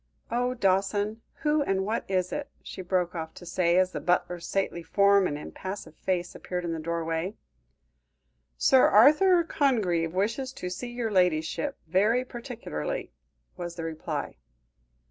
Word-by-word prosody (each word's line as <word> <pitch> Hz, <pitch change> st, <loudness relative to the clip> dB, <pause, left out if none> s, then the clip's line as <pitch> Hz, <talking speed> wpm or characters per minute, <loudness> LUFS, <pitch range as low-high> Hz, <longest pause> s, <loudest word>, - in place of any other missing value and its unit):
Oh! 245 Hz, +1 st, 0 dB
Dawson, 205 Hz, +1 st, +1 dB, 0.2 s
who 300 Hz, 0 st, +3 dB
and 195 Hz, -8 st, 0 dB
what 220 Hz, +3 st, -1 dB
is 185 Hz, -2 st, 0 dB
it?" 290 Hz, -1 st, -4 dB
she -, -, -7 dB
broke 180 Hz, -1 st, 0 dB
off 160 Hz, -2 st, -6 dB
to 175 Hz, -, -11 dB
say, 170 Hz, 0 st, +2 dB
as 185 Hz, 0 st, +3 dB
the -, -, -4 dB
butler's 175 Hz, -1 st, 0 dB
stately 195 Hz, -3 st, -1 dB
form 200 Hz, +3 st, +4 dB
and 145 Hz, -, -3 dB
impassive 185 Hz, +1 st, -7 dB
face 180 Hz, 0 st, -2 dB
appeared 180 Hz, -1 st, -4 dB
in 165 Hz, -, -2 dB
the 165 Hz, -, -4 dB
doorway. 165 Hz, +3 st, -2 dB, 1.2 s
"Sir 265 Hz, -, +5 dB
Arthur 340 Hz, -, +6 dB
Congreve 210 Hz, -, +1 dB
wishes 230 Hz, +7 st, -1 dB
to 180 Hz, -8 st, -5 dB
see 240 Hz, +7 st, -5 dB
your 240 Hz, -2 st, -3 dB
ladyship 180 Hz, -, +1 dB
very 210 Hz, +9 st, +2 dB
particularly," 245 Hz, -, -5 dB, 0.5 s
was 175 Hz, -1 st, -5 dB
the 165 Hz, -, -5 dB
reply. 160 Hz, -1 st, -4 dB
190 Hz, 145 wpm, -27 LUFS, 175-240 Hz, 1.2 s, Arthur